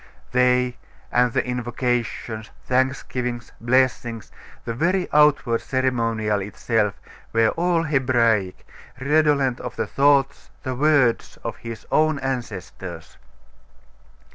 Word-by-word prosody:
They, 125 Hz, 0 st, +2 dB, 0.3 s
and 125 Hz, 0 st, +3 dB
the -, -, 0 dB
invocations, 120 Hz, -2 st, -2 dB, 0.2 s
thanksgivings, 125 Hz, -2 st, -1 dB
blessings, 120 Hz, -2 st, +1 dB, 0.3 s
the 115 Hz, -, -2 dB
very 180 Hz, +9 st, +1 dB
outward 145 Hz, -6 st, +4 dB
ceremonial 115 Hz, -5 st, 0 dB
itself, 105 Hz, +1 st, -1 dB, 0.3 s
were 115 Hz, -1 st, +4 dB
all 170 Hz, -1 st, +1 dB
Hebraic, 120 Hz, -, +1 dB, 0.3 s
redolent 140 Hz, -2 st, +2 dB
of 125 Hz, -1 st, -6 dB
the -, -, -1 dB
thoughts, 140 Hz, -1 st, +2 dB
the 130 Hz, -, -2 dB
words 135 Hz, -3 st, +2 dB
of -, -, -4 dB
his 115 Hz, -1 st, -8 dB
own 155 Hz, -1 st, +3 dB
ancestors. 125 Hz, -8 st, -6 dB
125 Hz, 100 wpm, -23 LUFS, 115-135 Hz, 0.3 s, outward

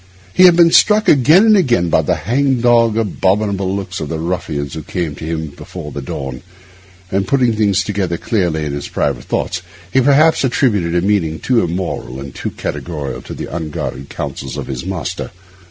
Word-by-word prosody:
He 185 Hz, -, +6 dB
had 175 Hz, -2 st, +7 dB
been 170 Hz, -1 st, +6 dB
struck 215 Hz, +4 st, +4 dB
again 155 Hz, -, +6 dB
and 220 Hz, -1 st, +6 dB
again 120 Hz, -, +2 dB
by -, -, +3 dB
the -, -, 0 dB
hang 130 Hz, +3 st, 0 dB
dog, 115 Hz, -2 st, +3 dB
abominable 100 Hz, -2 st, 0 dB
looks 100 Hz, -1 st, -5 dB
of 75 Hz, -, -5 dB
the 80 Hz, -, -2 dB
ruffians 80 Hz, -4 st, -3 dB
who 80 Hz, -, -5 dB
came 85 Hz, 0 st, -3 dB
to 75 Hz, -, -10 dB
him 80 Hz, -1 st, -3 dB
before 75 Hz, +1 st, -9 dB
the 70 Hz, -, -5 dB
dawn; 65 Hz, -1 st, -6 dB, 0.7 s
and 95 Hz, 0 st, 0 dB
putting 125 Hz, -3 st, +2 dB
things 100 Hz, -2 st, +2 dB
together 95 Hz, -5 st, -2 dB
clearly 85 Hz, -8 st, -1 dB
in 70 Hz, -, -3 dB
his 70 Hz, 0 st, -4 dB
private -, -, -2 dB
thoughts, 85 Hz, -, -2 dB, 0.3 s
he 130 Hz, -, +4 dB
perhaps 145 Hz, +5 st, +4 dB
attributed 105 Hz, -10 st, +1 dB
a 90 Hz, +1 st, +1 dB
meaning 90 Hz, -6 st, +1 dB
too 125 Hz, -3 st, +2 dB
immoral 85 Hz, -7 st, -4 dB
and 70 Hz, -1 st, -8 dB
too -, -, -4 dB
categorical 75 Hz, -5 st, -5 dB
to -, -, -8 dB
the -, -, -6 dB
unguarded 75 Hz, -4 st, -5 dB
counsels 65 Hz, -2 st, -5 dB
of -, -, -4 dB
his 65 Hz, +1 st, -5 dB
master. 90 Hz, -7 st, -4 dB
95 Hz, 185 wpm, -17 LUFS, 80-120 Hz, 0.7 s, had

